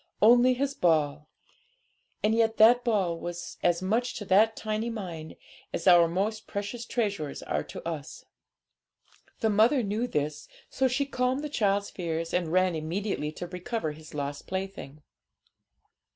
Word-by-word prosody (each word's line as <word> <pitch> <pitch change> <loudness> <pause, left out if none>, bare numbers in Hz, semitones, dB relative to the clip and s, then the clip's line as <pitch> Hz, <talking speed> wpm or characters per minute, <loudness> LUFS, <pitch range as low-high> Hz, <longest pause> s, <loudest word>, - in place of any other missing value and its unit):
Only 245 +3 +6
his 275 +2 -1
ball! 150 - +1 0.9
And 215 +1 +3
yet 225 0 +2
that 240 +3 +6
ball 190 -8 0
was 175 0 -6
as 175 +1 +2
much 235 +6 0
to 205 - -6
that 215 +4 +4
tiny 215 +1 -2
mind 175 -8 -6 0.4
as - - -4
our 175 -2 +7
most 200 +6 -2
precious 205 +4 -5
treasures 200 - -2
are - - -1
to - - -8
us. 155 -3 -6 1.2
The 220 - +2
mother 230 +5 +4
knew 215 +4 -1
this, 150 -5 -3 0.2
so 265 - +2
she 265 +3 0
calmed 260 +1 -1
the 300 - -3
child's 200 -6 0
fears, 165 -2 -3
and 175 -3 0
ran 185 0 +3
immediately 160 0 -2
to 175 - -6
recover 180 0 -3
his 155 0 -12
lost 145 0 -4
plaything. 190 -6 -6
195 Hz, 150 wpm, -28 LUFS, 165-225 Hz, 1.2 s, our